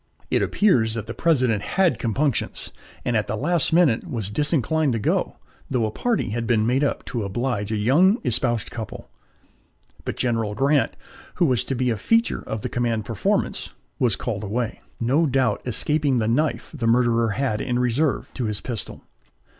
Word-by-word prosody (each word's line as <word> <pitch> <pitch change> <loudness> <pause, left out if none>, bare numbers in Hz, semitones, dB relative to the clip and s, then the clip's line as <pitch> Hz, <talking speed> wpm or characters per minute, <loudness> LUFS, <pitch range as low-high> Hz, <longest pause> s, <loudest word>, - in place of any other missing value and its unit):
It - - +3
appears 120 - +2
that 115 - -4
the 115 - -6
President 130 -11 +2
had 185 - +1
compunctions, 130 +3 -1 0.3
and 120 - 0
at 110 - +1
the 105 - -2
last 160 +6 0
moment 160 -9 +3
was 110 -5 -3
disinclined 150 +2 +1
to 115 - -1
go, - - 0 0.3
though 125 -4 +1
a 110 - -2
party 230 - -1
had 115 +2 -2
been 110 -2 +2
made 130 +5 +2
up 140 - -1
to 120 - -3
oblige 105 +1 -2
a - - 0
young 150 - +4
espoused 120 -2 0
couple; 115 -2 -7 0.9
but - - -4
General 115 -4 0
Grant, 140 +3 +2 0.4
who 180 - +3
was 130 -6 +2
to 135 - -2
be 125 0 +1
a 110 - -1
feature 230 - +1
of 110 -1 -3
the - - -2
commanded 115 -3 -1
performance, 110 -1 -1 0.3
was 120 -5 +2
called 110 -4 -4
away 110 +3 -3 0.2
no 140 +8 +2
doubt 130 -5 +1
escaping 140 +3 +1
the 110 -2 +1
knife 145 +7 0
the 125 -7 -2
murderer 115 -1 +3
had 120 -6 0
in 120 - -1
reserve 125 +4 +1
to 125 - -3
his 105 -1 -2
pistol. 115 -6 -4
120 Hz, 180 wpm, -23 LUFS, 110-140 Hz, 0.9 s, young